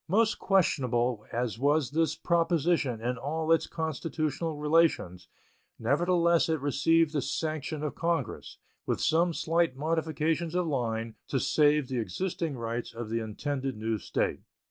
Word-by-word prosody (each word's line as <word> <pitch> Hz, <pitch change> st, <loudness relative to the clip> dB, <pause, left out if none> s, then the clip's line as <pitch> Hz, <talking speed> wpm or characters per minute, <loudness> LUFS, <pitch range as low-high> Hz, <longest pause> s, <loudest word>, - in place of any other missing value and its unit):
Most 220 Hz, +6 st, +2 dB
questionable 125 Hz, -, +1 dB
as 120 Hz, -1 st, -2 dB
was 145 Hz, -1 st, +2 dB
this 160 Hz, +1 st, +1 dB
proposition 165 Hz, -6 st, +1 dB
in 125 Hz, +1 st, -2 dB
all 160 Hz, +4 st, -2 dB
its 165 Hz, -, +3 dB
constitutional 160 Hz, 0 st, -3 dB
relations, 150 Hz, -, +1 dB, 0.5 s
nevertheless 170 Hz, +6 st, +2 dB
it 160 Hz, -1 st, +1 dB
received 150 Hz, +3 st, +2 dB
the 145 Hz, -, +1 dB
sanction 155 Hz, 0 st, -3 dB
of 150 Hz, -, -2 dB
Congress, 170 Hz, 0 st, -2 dB, 0.3 s
with -, -, 0 dB
some 170 Hz, +3 st, +3 dB
slight 165 Hz, -3 st, +1 dB
modifications 160 Hz, +2 st, -1 dB
of 180 Hz, -1 st, +1 dB
line, 115 Hz, -6 st, -2 dB
to 135 Hz, -, 0 dB
save 150 Hz, 0 st, +3 dB
the 125 Hz, -1 st, -2 dB
existing 155 Hz, -, -3 dB
rights 115 Hz, 0 st, -4 dB
of 115 Hz, -2 st, -6 dB
the 115 Hz, -, 0 dB
intended 130 Hz, +4 st, -3 dB
new 110 Hz, 0 st, -2 dB
State. -, -, -1 dB
150 Hz, 140 wpm, -29 LUFS, 125-165 Hz, 0.5 s, its